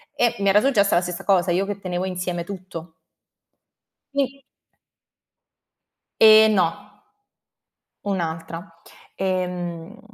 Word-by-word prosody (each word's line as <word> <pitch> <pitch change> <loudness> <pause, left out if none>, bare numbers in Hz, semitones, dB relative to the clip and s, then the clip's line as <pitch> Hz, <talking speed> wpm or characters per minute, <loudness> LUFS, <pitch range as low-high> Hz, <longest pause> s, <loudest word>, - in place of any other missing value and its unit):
e 240 -1 +2
mi 200 - 0
era 200 +2 +5
successa 215 -6 +3
la 175 - +4
stessa 180 -1 -5
cosa, 185 -3 +3
io 185 +3 +1
che 200 0 -5
tenevo 180 -1 -3
insieme 180 -2 -3
tutto. 180 -3 -9 1.2
Sì. 275 0 -2 1.8
Ehm, 220 0 +8
no. 190 +1 0 1.2
Un'altra. 165 -2 -5 0.3
Ehm. 180 +1 -3
185 Hz, 100 wpm, -22 LUFS, 175-205 Hz, 1.8 s, Ehm